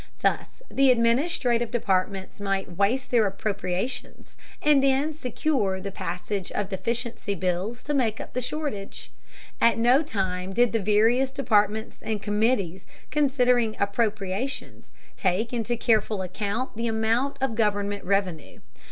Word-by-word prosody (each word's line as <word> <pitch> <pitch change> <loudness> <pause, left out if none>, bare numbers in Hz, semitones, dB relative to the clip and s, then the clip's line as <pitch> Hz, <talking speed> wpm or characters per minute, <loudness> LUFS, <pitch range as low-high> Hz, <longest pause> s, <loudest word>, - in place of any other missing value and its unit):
Thus - - -1
the 275 -1 +4
administrative 240 0 +2
departments 195 -4 -1
might 195 -3 -2
waste 220 +8 +1
their 230 -4 +4
appropriations, 195 +3 -3 0.2
and 295 -2 +4
then 275 +3 +2
secure 250 -8 -1
the 195 +1 -5
passage 180 +2 -4
of 205 -2 -2
deficiency 225 +1 -2
bills 185 +6 -2
to 295 - -2
make 230 -6 +1
up - - -8
the 255 - -1
shortage. 255 -6 -4 0.5
At 230 - +5
no 245 +5 +5
time 190 - -2
did 240 +2 +3
the 225 - +2
various 225 +6 +3
departments 220 -5 +1
and 220 -1 -2
committees 205 -3 0 0.3
considering 250 -6 +2
appropriations 205 +3 -2 0.3
take 200 +6 0
into 235 0 -1
careful 220 -4 +1
account 205 +7 -3
the 230 +1 -2
amount 225 +5 0
of 265 -3 0
government 205 -2 0
revenue. 185 -5 -1
220 Hz, 130 wpm, -26 LUFS, 195-250 Hz, 0.5 s, At